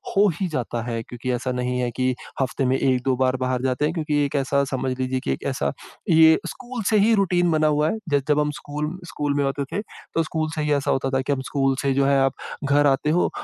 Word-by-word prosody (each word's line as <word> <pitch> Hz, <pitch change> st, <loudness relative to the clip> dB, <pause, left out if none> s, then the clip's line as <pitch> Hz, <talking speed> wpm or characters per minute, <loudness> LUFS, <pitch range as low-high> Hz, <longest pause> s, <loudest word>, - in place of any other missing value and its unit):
हो 205 Hz, +1 st, +5 dB
ही 190 Hz, -, 0 dB
जाता 120 Hz, -5 st, -3 dB
है 115 Hz, -1 st, -3 dB
क्योंकि 125 Hz, +2 st, -5 dB
ऐसा 125 Hz, +1 st, -2 dB
नहीं 125 Hz, 0 st, -1 dB
है 125 Hz, -1 st, 0 dB
कि 130 Hz, 0 st, +1 dB, 0.3 s
हफ्ते 135 Hz, 0 st, -1 dB
में 130 Hz, -, +2 dB
1-2 130 Hz, 0 st, +1 dB
बार 130 Hz, 0 st, +1 dB
बाहर 130 Hz, -1 st, 0 dB
जाते 130 Hz, +2 st, +1 dB
हैं 155 Hz, -, 0 dB
क्योंकि 155 Hz, -3 st, -1 dB
एक 140 Hz, -, -4 dB
ऐसा 140 Hz, 0 st, +1 dB
समझ 130 Hz, 0 st, -1 dB
लीजिए 130 Hz, 0 st, -1 dB
कि -, -, -1 dB
एक 65 Hz, -, -3 dB
ऐसा 70 Hz, -1 st, -1 dB, 0.4 s
ये 160 Hz, -1 st, +6 dB
स्कूल 250 Hz, -1 st, -6 dB
से 215 Hz, -, +4 dB
ही 220 Hz, +3 st, +4 dB
रूटीन 175 Hz, -3 st, +2 dB
बना 155 Hz, 0 st, +3 dB
हुआ 150 Hz, +1 st, +2 dB
है, -, -, -2 dB
ज 145 Hz, -1 st, +2 dB
जब 150 Hz, 0 st, +4 dB
हम 150 Hz, 0 st, +1 dB
स्कूल 150 Hz, +1 st, -4 dB, 0.2 s
स्कूल 145 Hz, -2 st, -2 dB
में 145 Hz, -, +2 dB
होते 140 Hz, 0 st, -1 dB
थे 205 Hz, -, 0 dB, 0.3 s
तो 165 Hz, -, +2 dB
स्कूल 155 Hz, 0 st, -2 dB
से 155 Hz, -, -1 dB
ही 150 Hz, 0 st, +1 dB
ऐसा 140 Hz, -1 st, +1 dB
होता 135 Hz, 0 st, 0 dB
था 130 Hz, -, +1 dB
कि 140 Hz, +2 st, 0 dB
हम 130 Hz, -, -3 dB
स्कूल 135 Hz, -2 st, +2 dB
से 135 Hz, -, +2 dB
जो 135 Hz, +1 st, +2 dB
है 140 Hz, 0 st, +3 dB
आप 135 Hz, 0 st, +2 dB, 0.3 s
घर 145 Hz, +1 st, +4 dB
आते 140 Hz, +2 st, +2 dB
हो 175 Hz, +3 st, +2 dB
140 Hz, 255 wpm, -23 LUFS, 130-155 Hz, 0.4 s, ये